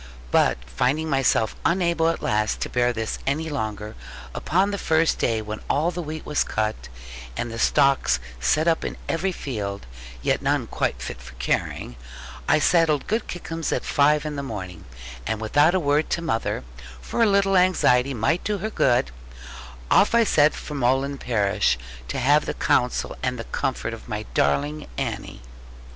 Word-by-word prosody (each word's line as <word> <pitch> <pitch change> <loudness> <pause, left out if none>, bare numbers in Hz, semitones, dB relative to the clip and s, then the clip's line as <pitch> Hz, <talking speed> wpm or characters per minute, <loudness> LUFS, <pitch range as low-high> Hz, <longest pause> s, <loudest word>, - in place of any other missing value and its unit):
But - - +3
finding 135 - 0
myself 135 -5 +2
unable 170 -2 +2
at 165 - -3
last 110 0 0
to - - -3
bear 125 0 +2
this 110 -2 -3
any 155 +4 0
longer, 110 -5 -4 0.4
upon 190 +4 +1
the 200 - -3
first 160 0 +2
day 110 -2 0
when 110 0 -5
all 160 +5 +2
the 175 0 -4
wheat 155 -1 -6
was 150 - +1
cut, 110 - -2 0.5
and 120 - -3
the 115 - -6
stooks 135 - +3 0.2
set 155 - +2
up 165 -1 +2
in - - -4
every 185 +4 0
field, 105 - -5 0.4
yet - - +1
none - - +1
quite - - -2
fit - - -6
for 65 +1 -12
carrying, - - -2 0.5
I - - +5
saddled 155 -2 +3
good 220 +2 -1
Kickums 165 -2 -4
at - - -1
five 150 +1 +3
in 150 -1 -4
the - - -2
morning, 95 -10 -7 0.4
and 110 - -1
without 145 +10 +3
a - - +3
word 145 -1 +1
to 170 - -1
mother 115 -9 -1 0.4
(for 150 - -3
a 230 - +6
little 195 -1 +3
anxiety 140 -8 +3
might 140 +10 +1
do 210 -1 -1
her 215 +3 -4
good) 120 - +2 0.8
off 210 - +5
I 235 - +6
set 155 -8 +4
for 150 - -7
Molland 135 +1 +1
parish, 105 - +1 0.3
to - - -4
have 145 +4 +3
the - - -2
counsel 125 0 +1
and 125 0 -1
the 115 - -5
comfort - - -2
of - - -10
my - - -3
darling 145 - 0
Annie. 115 - -4
140 Hz, 175 wpm, -24 LUFS, 110-165 Hz, 0.8 s, a